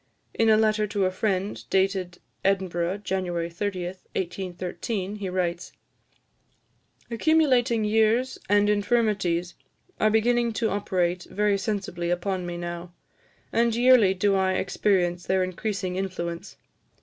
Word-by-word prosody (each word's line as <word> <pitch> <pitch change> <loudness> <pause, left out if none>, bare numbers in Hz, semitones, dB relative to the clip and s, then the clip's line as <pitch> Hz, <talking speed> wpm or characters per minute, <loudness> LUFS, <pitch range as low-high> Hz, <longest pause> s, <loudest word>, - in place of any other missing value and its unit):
In 225 -1 +2
a 215 - +6
letter 215 -1 +2
to 200 -1 0
a 185 - +1
friend, 195 0 -2
dated 190 -2 0 0.3
Edinburgh, 190 -1 0
January 175 -3 -2
30, 185 0 -3 0.3
1813, 185 +2 -4
he 200 -2 -4
writes: 180 -1 -2 1.4
"Accumulating 245 -4 +3
years 220 +4 +2
and 205 0 +4
infirmities 205 -5 +1 0.5
are 215 - +4
beginning 235 +2 +2
to 220 0 0
operate 180 -3 -1
very 205 +1 +1
sensibly 190 -5 -3
upon 180 +1 -1
me 175 0 -4
now, 175 0 -6 0.6
and 235 -1 +2
yearly 240 -5 +5
do 200 +2 +2
I 190 -1 +2
experience 180 -2 0
their 190 0 +2
increasing 185 0 -3
influence. 180 -1 -4
195 Hz, 120 wpm, -25 LUFS, 180-215 Hz, 1.4 s, a